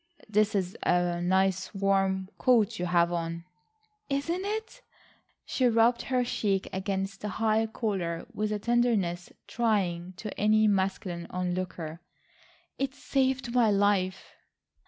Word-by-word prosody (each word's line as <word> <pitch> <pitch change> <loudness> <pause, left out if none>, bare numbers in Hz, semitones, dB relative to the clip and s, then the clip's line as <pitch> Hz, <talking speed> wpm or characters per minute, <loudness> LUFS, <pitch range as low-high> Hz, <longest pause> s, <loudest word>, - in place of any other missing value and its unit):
"That 215 0 +2
is 185 -2 -1
a 175 -1 +1
nice 190 +2 +1
warm 195 -1 +1
coat 230 -8 +3
you 180 - -1
have 170 -1 +3
on." 170 0 -3 0.6
"Isn't 330 +7 -1
it?" 440 +4 -4 0.6
She 255 - +1
rubbed 230 +1 +3
her 255 -2 0
cheek 200 -5 -1
against 195 0 -3
the 210 - -3
high 220 +2 +1
collar 190 -7 -2
with 215 0 -1
a 210 - 0
tenderness 210 -7 0
trying 185 -6 0
to 210 +3 -7
any 215 +1 +4
masculine 190 -3 -1
onlooker. 180 -2 -4 0.8
"It 270 0 -2
saved 260 -3 0
my 240 -3 +4
life." 200 -2 +1
195 Hz, 125 wpm, -28 LUFS, 180-230 Hz, 0.8 s, any